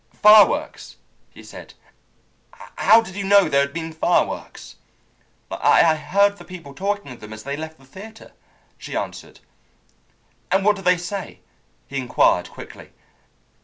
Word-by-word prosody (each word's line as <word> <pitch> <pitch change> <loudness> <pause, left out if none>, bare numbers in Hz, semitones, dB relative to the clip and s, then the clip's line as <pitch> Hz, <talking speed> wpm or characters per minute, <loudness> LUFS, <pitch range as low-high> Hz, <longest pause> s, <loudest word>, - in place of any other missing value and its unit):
"Fireworks!" 210 0 +4 0.3
he - - -16
said. - - -13 1.0
"How 225 +1 +5
did 190 -5 -10
you 200 - -4
know 200 -1 +4
there 140 -2 +2
had 140 0 -2
been 165 +1 -6
fireworks?" 165 +2 -2 0.7
"I 160 - +3
heard 200 +5 +1
the - - -13
people 170 -7 -11
talking 200 -2 -4
of 125 - -11
them 105 0 -12
as 110 0 -10
they 140 +1 -4
left 160 +1 -8
the 135 - -21
theatre," 215 +10 -13 0.5
she - - -8
answered. - - -7 1.1
"And 195 +2 +1
what 210 0 +4
did 195 - -11
they 180 0 +4
say?" 185 +3 -7 0.4
he 140 - -7
inquired 125 -2 +1
quickly. - - -13
180 Hz, 145 wpm, -21 LUFS, 140-200 Hz, 1.1 s, How